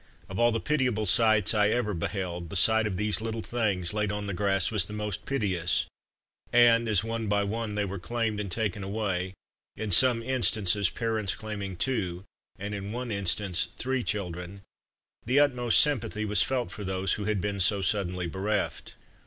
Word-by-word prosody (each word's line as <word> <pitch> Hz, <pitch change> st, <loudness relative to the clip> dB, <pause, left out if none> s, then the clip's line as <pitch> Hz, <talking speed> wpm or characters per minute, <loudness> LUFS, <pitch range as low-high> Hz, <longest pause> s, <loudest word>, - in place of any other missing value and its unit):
Of 95 Hz, -, -5 dB
all 120 Hz, 0 st, +5 dB
the 115 Hz, -, 0 dB
pitiable 125 Hz, -6 st, 0 dB
sights 110 Hz, +1 st, +3 dB
I 105 Hz, -1 st, +3 dB
ever 110 Hz, -2 st, 0 dB
beheld, 90 Hz, -1 st, -3 dB
the 100 Hz, -, -7 dB
sight 110 Hz, +3 st, +4 dB
of 95 Hz, -3 st, -3 dB
these 105 Hz, +1 st, 0 dB
little 115 Hz, 0 st, -3 dB
things 100 Hz, -7 st, -1 dB
laid 105 Hz, -1 st, 0 dB
on 105 Hz, 0 st, -3 dB
the 100 Hz, -, -3 dB
grass 95 Hz, -1 st, +1 dB
was 105 Hz, -4 st, +2 dB
the 105 Hz, -, -9 dB
most 105 Hz, -2 st, -4 dB
piteous; 90 Hz, -, 0 dB, 0.7 s
and, 115 Hz, -1 st, +5 dB
as, 105 Hz, -2 st, +3 dB
one 115 Hz, 0 st, -3 dB
by 100 Hz, 0 st, +2 dB
one 105 Hz, +1 st, -3 dB
they 105 Hz, -1 st, 0 dB
were 100 Hz, 0 st, -5 dB
claimed 115 Hz, +2 st, -2 dB
and 100 Hz, -3 st, -4 dB
taken 105 Hz, 0 st, -2 dB
away 95 Hz, -2 st, -2 dB, 0.4 s
in 110 Hz, -2 st, -4 dB
some 120 Hz, +3 st, +5 dB
instances 110 Hz, -6 st, +2 dB
parents 110 Hz, -6 st, -1 dB
claiming 100 Hz, -2 st, -5 dB
two, 95 Hz, -7 st, -1 dB, 0.3 s
and 100 Hz, +2 st, -5 dB
in 100 Hz, 0 st, -5 dB
one 120 Hz, +1 st, -4 dB
instance, 100 Hz, -2 st, +1 dB
three 130 Hz, -1 st, -1 dB
children 95 Hz, -1 st, -4 dB, 0.6 s
the 130 Hz, +4 st, +4 dB
utmost 125 Hz, -5 st, +3 dB
sympathy 115 Hz, -7 st, +1 dB
was 105 Hz, 0 st, +2 dB
felt 125 Hz, -8 st, 0 dB
for 105 Hz, -, -7 dB
those 95 Hz, 0 st, -1 dB
who 105 Hz, -, -3 dB
had 105 Hz, -1 st, 0 dB
been 100 Hz, +1 st, -2 dB
so 95 Hz, +1 st, +2 dB
suddenly 90 Hz, -2 st, -1 dB
bereft. 95 Hz, +4 st, -2 dB
105 Hz, 180 wpm, -28 LUFS, 95-115 Hz, 0.7 s, all